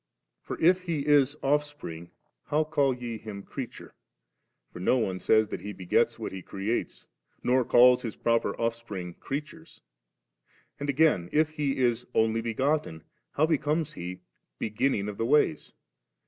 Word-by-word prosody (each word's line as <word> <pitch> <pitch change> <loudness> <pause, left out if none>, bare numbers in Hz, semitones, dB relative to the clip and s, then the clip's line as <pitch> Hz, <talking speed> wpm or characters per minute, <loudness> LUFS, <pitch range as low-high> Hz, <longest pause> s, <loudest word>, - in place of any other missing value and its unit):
48. - - -38
For 160 - +1
if 185 +1 +4
He 155 -4 -1
b 145 -1 +5 0.2
Offspring, 145 - -2 0.4
how 155 +2 +1
call 145 -4 +1
je 120 -2 -6
Him 100 -3 -8
creature? - - -8 0.8
for - - -8
no 95 +8 +3
one 95 -6 -1
says 110 +1 +3
that - - -5
He 105 0 -6
b^ets 90 -2 +1
what - - -5
He 95 - -6
creates, 100 +6 -3 0.4
nor 130 +1 +3
adls 125 +1 +6
His 115 -4 -5
proper 115 0 0
off 115 0 +1
spring 100 -7 -7
creatures; 155 - -7 1.0
and 145 0 -3
again, 140 - +3
if 155 +1 +2
He 145 -3 -1
b - - -2
Onlj 115 -2 +1
begotten. 115 - -1 0.3
how 155 - +3
becomes 155 0 0
He 90 +1 -7 0.2
* - - -55
beginning 105 -1 0
of 105 -1 -5
the 115 - +1
ways?' 150 +2 +2
125 Hz, 160 wpm, -28 LUFS, 105-150 Hz, 1.0 s, adls